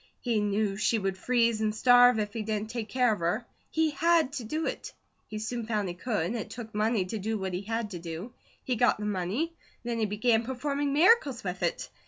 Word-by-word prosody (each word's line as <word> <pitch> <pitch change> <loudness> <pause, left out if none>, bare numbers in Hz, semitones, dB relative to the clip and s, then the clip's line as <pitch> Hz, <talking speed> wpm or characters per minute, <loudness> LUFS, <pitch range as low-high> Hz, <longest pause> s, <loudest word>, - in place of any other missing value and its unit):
He 235 -3 +1
knew 205 -1 0
she 220 +2 +2
would 195 -2 -1
freeze 235 +1 +1
and 215 -1 0
starve 245 +1 +6
if 210 -1 -2
he 225 - -3
didn't 215 0 -3
take 230 -3 -4
care 250 -2 +3
of 210 - -5
her; 175 +8 -1 0.2
he 320 -1 +1
HAD 325 -2 +2
to 270 -4 -4
do 310 +8 -2
it. - - -4 0.3
He 215 - -6
soon 220 +1 -4
found 210 -4 -1
he - - -4
could. 200 -1 -2
It 230 -3 -4
took 230 -2 -8
money 210 -1 +1
to 210 +4 -4
do 220 +3 -2
what 190 -2 -4
he 180 - -2
had 225 +1 -3
to 175 - -5
do. 170 +7 -7 0.3
He 255 - -1
got 245 +2 +3
the 210 - -5
money. 210 - -1 0.3
Then 235 -1 -2
he 220 - +1
began 225 +2 +2
performing 280 +3 -2
miracles 295 - +4
with 180 -1 -4
it. 175 - -2
220 Hz, 225 wpm, -28 LUFS, 205-245 Hz, 0.3 s, starve